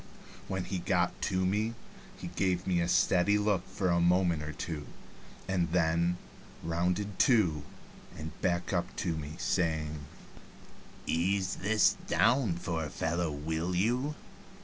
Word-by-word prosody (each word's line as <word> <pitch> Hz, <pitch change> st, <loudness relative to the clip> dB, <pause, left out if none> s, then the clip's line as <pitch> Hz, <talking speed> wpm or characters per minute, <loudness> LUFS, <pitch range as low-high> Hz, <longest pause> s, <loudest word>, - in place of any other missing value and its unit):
When 95 Hz, -1 st, -2 dB
he 95 Hz, -1 st, -3 dB
got -, -, 0 dB
to 95 Hz, 0 st, +1 dB
me 105 Hz, +5 st, 0 dB, 0.4 s
he -, -, -6 dB
gave 90 Hz, -2 st, 0 dB
me 90 Hz, -2 st, +1 dB
a 85 Hz, -, 0 dB
steady 90 Hz, +3 st, +3 dB
look 105 Hz, -3 st, 0 dB
for 95 Hz, -1 st, -1 dB
a 85 Hz, -, +3 dB
moment 85 Hz, -2 st, +3 dB
or 75 Hz, 0 st, -4 dB
two, 75 Hz, -1 st, -5 dB, 0.6 s
and 90 Hz, -3 st, 0 dB
then 85 Hz, 0 st, +2 dB, 0.5 s
rounded 90 Hz, +4 st, -1 dB
to 90 Hz, -, +4 dB, 0.6 s
and 80 Hz, 0 st, -6 dB
backed 90 Hz, +1 st, 0 dB
up 85 Hz, -1 st, -1 dB
to 85 Hz, -3 st, -1 dB
me, 75 Hz, -1 st, -6 dB
saying: 80 Hz, -3 st, 0 dB, 1.1 s
"Ease 95 Hz, +3 st, 0 dB
this 105 Hz, +1 st, +3 dB
down 120 Hz, -9 st, +3 dB
for 85 Hz, -1 st, -3 dB
a 75 Hz, -, -4 dB
fellow, 85 Hz, +2 st, -1 dB
will 80 Hz, +4 st, -2 dB
you?" 125 Hz, +10 st, +1 dB
90 Hz, 140 wpm, -31 LUFS, 80-95 Hz, 1.1 s, to